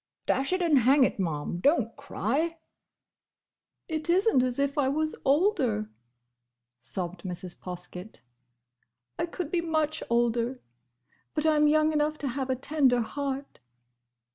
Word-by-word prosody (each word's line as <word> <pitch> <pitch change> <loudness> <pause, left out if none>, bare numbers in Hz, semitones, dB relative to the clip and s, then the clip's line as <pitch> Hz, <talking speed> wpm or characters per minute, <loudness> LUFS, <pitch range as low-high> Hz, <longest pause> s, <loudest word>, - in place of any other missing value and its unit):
"Dash 270 +4 +1
it 370 0 +1
and 310 -5 +4
hang 265 +3 +5
it, 250 - 0
Ma'am, 165 -1 -2
don't 240 - +2
cry!" 285 - -2 1.3
"It 315 0 -3
is 380 +5 +3
n't 265 -13 +4
as 250 -1 0
if 280 +1 0
I 280 -3 +2
was 310 +2 -1
older," 270 - +2 0.9
sobbed 170 +8 -4
Mrs. 180 -1 -6
Poskett. 180 - -8 1.0
"I - - 0
could 340 -2 -5
be 350 - +1
much 315 -2 0
older! 235 +1 +1 0.8
But 305 0 0
I'm 300 -1 +4
young 310 +1 +3
enough 300 0 +1
to 280 - -3
have 265 +1 -3
a 260 - +2
tender 265 -2 +2
heart!" 275 +3 -4
275 Hz, 140 wpm, -28 LUFS, 230-310 Hz, 1.3 s, hang